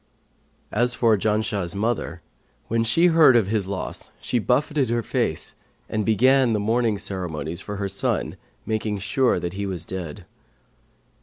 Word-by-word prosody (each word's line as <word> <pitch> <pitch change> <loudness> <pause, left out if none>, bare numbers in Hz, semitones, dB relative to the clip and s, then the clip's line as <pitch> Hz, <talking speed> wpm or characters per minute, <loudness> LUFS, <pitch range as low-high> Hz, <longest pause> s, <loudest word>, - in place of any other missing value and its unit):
As 120 +3 +2
for 115 -2 +4
Janshah's 105 -3 0
mother, 110 +3 -2 0.5
when 115 0 +1
she 120 +10 +3
heard 160 -6 +6
of 115 -4 +4
his 105 -3 0
loss 95 -1 -4
she 125 - -1
buffeted 140 +3 +1
her 120 0 0
face - - -2 0.3
and 110 -1 -1
began 125 +4 +4
the 105 - +1
mourning 110 0 +1
ceremonies 85 -4 -4
for 105 - -6
her 100 0 -2
son 100 0 -2 0.3
making 110 -1 -1
sure 120 +6 +1
that 85 0 -4
he 100 +1 -3
was 90 -4 -4
dead. 90 -6 -6
110 Hz, 150 wpm, -23 LUFS, 95-120 Hz, 0.5 s, heard